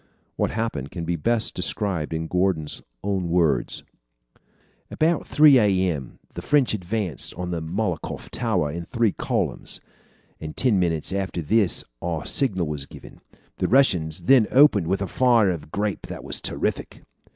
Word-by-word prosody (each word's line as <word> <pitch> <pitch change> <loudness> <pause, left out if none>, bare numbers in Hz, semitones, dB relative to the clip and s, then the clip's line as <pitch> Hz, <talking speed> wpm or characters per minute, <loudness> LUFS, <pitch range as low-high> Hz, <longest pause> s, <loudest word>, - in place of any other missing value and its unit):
What - - 0
happened 110 - -3
can 85 -2 -6
best 95 +8 0
be - - -14
described 90 -8 -1
in 80 0 -2
Gordon's 90 -3 -1 0.2
own 95 -3 -1
words: 80 -8 +1 1.1
"About 160 0 0
three 145 -3 +6
a. 95 -4 +2
m. 65 -4 -9 0.2
the - - -6
French 145 -5 +2
advanced 100 -4 -4
on 90 0 -4
the 85 -2 -2
Malakoff 90 +1 -4
tower 75 -1 0
in 85 +2 -5
three 115 +4 0
columns, - - -3 0.6
and 80 -1 -8
ten 120 -7 +3
minutes 85 -1 -1
after 95 -2 -2
this 105 +2 +2 0.2
our 85 -3 -3
signal 95 -11 +2
was 75 -2 -5
given. - - -13 0.4
The - - 0
Russians 90 - +2
then 125 -5 +5
opened 130 - +5
with 95 +2 0
a - - -3
fire 120 -5 +3
of 75 -4 -6
grape 105 0 -2
that - - -7
was - - -3
terrific." - - -3
95 Hz, 155 wpm, -24 LUFS, 80-110 Hz, 1.1 s, three